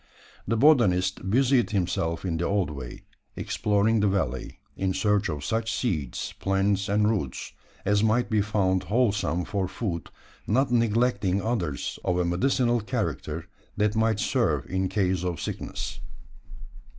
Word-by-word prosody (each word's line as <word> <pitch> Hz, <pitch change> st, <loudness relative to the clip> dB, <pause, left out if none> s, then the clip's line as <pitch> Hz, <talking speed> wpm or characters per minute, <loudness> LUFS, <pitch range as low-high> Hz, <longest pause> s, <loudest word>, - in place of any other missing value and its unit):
The 115 Hz, +2 st, +1 dB
botanist 95 Hz, -9 st, +3 dB
busied 125 Hz, +2 st, +3 dB
himself 90 Hz, -4 st, -1 dB
in 85 Hz, -3 st, -1 dB
the 85 Hz, -, -1 dB
old 100 Hz, -6 st, 0 dB
way, 65 Hz, -4 st, -8 dB, 0.3 s
exploring 105 Hz, +2 st, +1 dB
the 105 Hz, -, +3 dB
valley, 75 Hz, -11 st, -2 dB, 0.2 s
in 95 Hz, -1 st, -1 dB
search 105 Hz, +1 st, +1 dB
of 70 Hz, -2 st, -4 dB
such 115 Hz, +3 st, -1 dB
seeds, 80 Hz, -, -2 dB
plants, 95 Hz, 0 st, +1 dB
and 105 Hz, +1 st, +3 dB
roots, 100 Hz, -, -2 dB, 0.3 s
as 105 Hz, 0 st, +3 dB
might 110 Hz, +3 st, +2 dB
be 110 Hz, -2 st, +2 dB
found 95 Hz, -3 st, +1 dB
wholesome 105 Hz, -6 st, +1 dB
for 100 Hz, -3 st, -1 dB
food 90 Hz, -3 st, -4 dB, 0.4 s
not 130 Hz, +4 st, +2 dB
neglecting 115 Hz, -4 st, +2 dB
others 95 Hz, -, -2 dB
of 90 Hz, -, 0 dB
a 90 Hz, -, +1 dB
medicinal 120 Hz, +7 st, +2 dB
character, 80 Hz, -5 st, -3 dB, 0.3 s
that 105 Hz, +1 st, +1 dB
might 110 Hz, -1 st, +2 dB
serve -, -, +1 dB
in 95 Hz, 0 st, -1 dB
case 95 Hz, -2 st, 0 dB
of 90 Hz, -3 st, -2 dB
sickness. -, -, -5 dB
100 Hz, 140 wpm, -26 LUFS, 90-110 Hz, 0.4 s, botanist